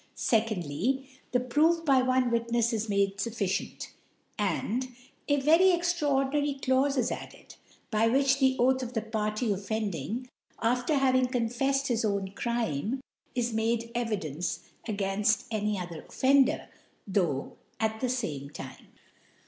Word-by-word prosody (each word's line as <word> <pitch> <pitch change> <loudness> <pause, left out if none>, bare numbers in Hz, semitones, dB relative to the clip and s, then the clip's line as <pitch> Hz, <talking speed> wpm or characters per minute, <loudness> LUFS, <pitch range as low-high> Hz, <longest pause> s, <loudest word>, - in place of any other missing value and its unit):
2rf/y, 220 - 0 0.2
The 250 - +3
Proof 315 +7 +2
by 270 -3 +5
one 255 -1 +2
Witnefs 235 0 +1
is 220 0 -2
made 200 -1 +1
fufficient; 200 -3 -2 0.5
and, 220 +4 -1
3^^'J 250 - -20 0.3
A 285 -1 +3
very 325 +6 +5
extraor 335 -7 +2
dinary 290 -2 0
Ciaufe 270 +1 +2
is 255 - +1
added, - - -8 0.4
by 220 +1 +3
which 270 +3 +3
the 265 -1 +4
Oath 260 +2 +3
'of 250 -1 -5
the 225 - 0
Party 215 0 -1
offending, 210 - -3 0.3
after 245 +5 +1
having 260 -2 +3
con 245 -3 0
fcffed 270 +3 0
his 235 -4 0
own 200 -2 0
Crime, 235 - -1 0.4
is 240 -2 0
made 230 +1 0
Evidence 180 - -2 0.3
agairUl 205 0 +1
any 210 -1 0
other 175 -3 -6
Offender, 270 0 +3 0.4
tho' 175 -9 -1 0.2
at 220 0 0
the 255 - -1
fame 150 - -3
Time. - - -10
235 Hz, 140 wpm, -29 LUFS, 210-265 Hz, 0.5 s, by